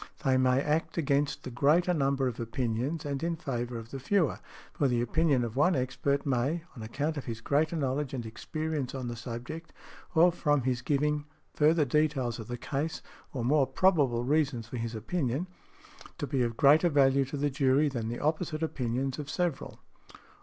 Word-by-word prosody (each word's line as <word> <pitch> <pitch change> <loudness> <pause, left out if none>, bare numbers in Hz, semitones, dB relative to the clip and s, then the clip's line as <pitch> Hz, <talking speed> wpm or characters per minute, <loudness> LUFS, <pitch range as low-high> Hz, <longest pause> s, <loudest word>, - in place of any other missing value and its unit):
They 135 -3 +3
may 130 0 +3
act 150 +5 -1
against 145 -2 0
the 130 - -6
greater 155 +8 +3
number 135 -3 +1
of 125 -1 -4
opinions 120 +6 -2
and 140 -2 -3
in 170 0 -1
favour 120 -7 -4
of 115 0 -9
the 135 - -5
fewer; 170 +5 +1 0.3
for 145 - +1
the 120 -2 +1
opinion 140 +2 +2
of 115 -1 -4
one 175 +7 +3
expert 140 +2 -1
may, 140 +5 0
on 115 - -9
account 145 +8 -2
of 140 - -5
his 115 -2 -5
greater 150 +7 +1
knowledge 140 -2 -1
and 125 -4 -4
experience 150 +4 -4
on 130 -2 -4
the 120 - -4
subject, 125 +8 -7 0.4
or 170 +2 +6
from 145 -5 +1
his 125 -1 0
giving 150 +2 0 0.3
further 155 +1 +3
details 135 -4 0
of 110 - -7
the 120 - -4
case, 150 +5 -3 0.3
or 125 -4 -3
more 140 +1 +3
probable 145 -11 +2
reasons 135 -4 +1
for 125 - -6
his 115 0 -4
opinions, 135 - -1 0.8
be 135 - +1
of 115 -2 -1
greater 150 +5 +6
value 140 -2 +4
to 135 +3 -5
the 145 +1 0
jury 135 +1 +3
than 120 -6 -3
the 120 +1 -4
opposite 155 +1 -1
opinions 130 -2 -2
of 145 -1 -6
several. 175 -6 -2
140 Hz, 180 wpm, -29 LUFS, 125-155 Hz, 0.8 s, or